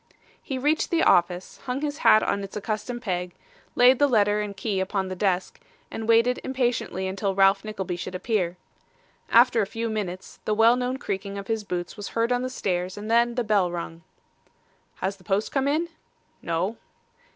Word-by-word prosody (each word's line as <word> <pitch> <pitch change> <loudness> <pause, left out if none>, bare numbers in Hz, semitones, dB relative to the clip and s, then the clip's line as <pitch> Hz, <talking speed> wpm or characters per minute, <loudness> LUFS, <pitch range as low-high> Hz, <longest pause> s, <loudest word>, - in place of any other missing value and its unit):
He 265 - -4
reached 295 +5 +1
the 335 -1 +2
office, 175 +1 +2
hung 255 +1 -2
his 295 -1 -3
hat 215 - +6
on 200 - -1
its 195 +1 -7
accustomed 215 +3 -4
peg, 180 -3 -3 0.4
laid 250 +1 +6
the 290 - +5
letter 210 -4 +3
and 205 -2 -5
key 195 -1 -1
upon 190 0 -1
the 185 - -4
desk, 185 -1 -1 0.3
and 225 0 -5
waited 230 +2 +4
impatiently 245 -8 -1
until 195 0 -2
Ralph 195 0 +4
Nickleby 190 -5 -4
should 185 +1 -6
appear. 185 -3 -1 0.7
After 235 0 +5
a 200 - -1
few 230 +2 -3
minutes, 190 -4 -5
the 215 - +1
well 225 +2 +6
known 250 +1 -2
creaking 200 -5 -4
of 200 - -6
his 225 0 -2
boots 180 0 -4
was 205 - -5
heard 230 +1 +2
on 245 0 +2
the 255 - -2
stairs, 185 -6 -2
and 210 +2 -5
then 235 +1 +3
the 245 - 0
bell 205 -4 +2
rung. 170 -1 -6 0.9
'Has 195 +2 -3
the 185 - -20
post 195 +4 -1
come 270 -1 0
in?' 310 +4 +1 0.5
'No. 175 +7 -2
210 Hz, 185 wpm, -25 LUFS, 190-240 Hz, 0.9 s, hat